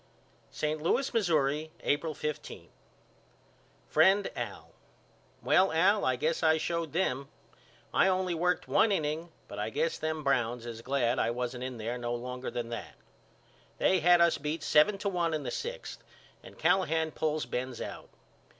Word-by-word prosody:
St. 155 0 -2
Louis, 250 - +1
Missouri, 155 -7 +1
April 155 +2 0
15. 150 -1 -5 1.2
FRIEND 195 +1 +4
AL: - - -6 0.7
Well 190 +1 +4
Al 195 +6 +3
I 130 - +2
guess 155 +6 -1
I 160 -1 +4
showed 170 -1 -2
them. 140 -6 -1 0.7
I - - +4
only 185 -1 +1
worked 180 +2 0
one 220 - +4
inning 160 -1 -1 0.2
but - - -8
I - - -1
guess 480 +1 -1
them 160 -1 -2
Browns 125 -3 0
is 115 -1 -7
glad 130 -1 0
I - - +2
wasn't 125 +1 -3
in 130 -2 -5
there 115 +3 -4
no 120 0 -2
longer 125 +1 -5
than 120 -1 -4
that. 115 - -6 0.8
They 190 - +3
had 175 +1 +5
us 170 -1 +4
beat 150 +2 -3
seven 175 +7 +4
to 200 - -3
one 170 -4 0
in 150 - -3
the 125 - -4
sixth 485 +2 -6 0.4
and - - -14
Callahan 160 -4 +2
pulls 155 -2 -1
Benz 125 0 -4
out. - - -7
155 Hz, 160 wpm, -30 LUFS, 130-175 Hz, 1.2 s, had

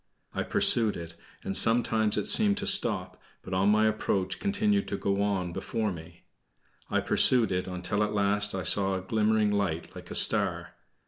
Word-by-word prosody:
I - - -3
pursued 110 -3 +3
it, 85 -1 -9 0.3
and 95 - -4
sometimes 115 -2 +3
it - - -2
seemed 210 -2 +4
to 205 - -3
stop, 120 - 0 0.2
but 95 - -8
on 95 +2 +1
my 110 +1 +2
approach 100 -3 -2
continued 205 0 -1
to 100 - -4
go 100 0 -2
on 95 -4 -2
before 110 +1 -4
me. 85 0 -12 0.7
I - - 0
pursued 120 -5 +3
it, 90 0 -3
until 90 +2 -4
at 105 0 -1
last 100 0 0
I 95 - -4
saw 95 +3 +1
a 95 - -4
glimmering 105 +1 0
light 100 -5 -3
like - - -11
a - - -8
star. - - 0
105 Hz, 180 wpm, -27 LUFS, 95-110 Hz, 0.7 s, seemed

